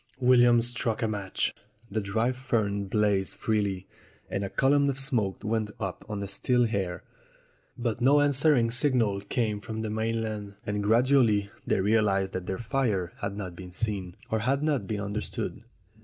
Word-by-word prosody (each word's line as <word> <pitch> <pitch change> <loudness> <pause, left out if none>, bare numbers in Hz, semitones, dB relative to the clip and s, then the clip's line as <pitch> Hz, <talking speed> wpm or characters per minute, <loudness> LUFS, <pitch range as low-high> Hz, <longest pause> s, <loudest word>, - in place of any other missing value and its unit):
William 120 -2 +5
struck 120 -1 -2
a - - +2
match. 105 -3 -2 0.4
The 110 +2 0
dry 110 +5 0
fern 115 -6 -1
blazed 100 -1 +1
freely, 100 -4 -1 0.5
and 100 - -1
a 100 - -3
column 140 +4 +3
of 135 - -2
smoke 120 -10 0
went 110 0 -1
up 95 -3 -4
on 105 -1 -3
the 100 - -3
still 120 +5 +1
air. 90 -3 -2 0.7
But 120 -1 -2
no 140 +4 +5
answering 145 -4 +3
signal 120 -6 +2
came 105 0 -1
from 110 +1 -5
the 110 - -3
main 115 +1 -1
land, 105 -2 -5
and 105 0 -1
gradually 110 -2 +3 0.2
they - - +2
realized 100 -2 +2
that 95 -1 -4
their 95 - -2
fire 110 -8 -1
had 100 0 -3
not 95 -4 -5
been 90 0 -9
seen, 95 -2 -3 0.2
or 110 - +1
had 135 +6 0
not 145 -10 0
been 105 -1 -2
understood. 105 +1 -4
110 Hz, 170 wpm, -28 LUFS, 100-120 Hz, 0.7 s, William